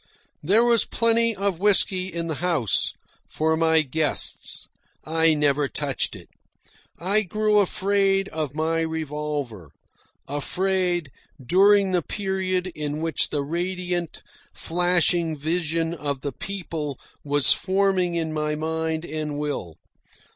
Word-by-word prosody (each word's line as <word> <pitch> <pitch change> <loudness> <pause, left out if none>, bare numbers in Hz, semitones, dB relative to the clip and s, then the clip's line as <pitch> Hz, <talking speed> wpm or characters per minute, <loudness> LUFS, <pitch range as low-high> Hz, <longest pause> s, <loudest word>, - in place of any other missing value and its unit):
There 200 +9 +4
was 235 -2 +5
plenty 230 0 +2
of 195 -3 -1
whisky 190 -2 +3
in 170 -2 -3
the 160 -3 -4
house 165 - 0 0.3
for 160 +1 0
my 160 -1 +3
guests. 150 +2 0 0.4
I 160 0 +2
never 145 -1 +2
touched 140 -1 -2
it. - - -12 0.7
I 200 +5 +1
grew 215 +2 +1
afraid 195 0 +1
of 150 -3 -4
my 160 +1 0
revolver 150 - -4 0.6
afraid 175 +1 0 0.3
during 195 +8 +4
the 180 -1 +2
period 190 0 -2
in 150 0 -3
which 165 0 +1
the 145 -2 -1
radiant, 175 +2 -3 0.3
flashing 175 -1 +1
vision 165 +2 -1
of 145 -4 -4
the 140 - -3
PEOPLE 160 -8 -5 0.2
was 145 -1 +3
forming 185 -1 +1
in 160 -2 -1
my 150 0 -1
mind 160 +1 -2
and 155 -2 -3
will. 145 - -4
165 Hz, 120 wpm, -24 LUFS, 150-185 Hz, 0.7 s, was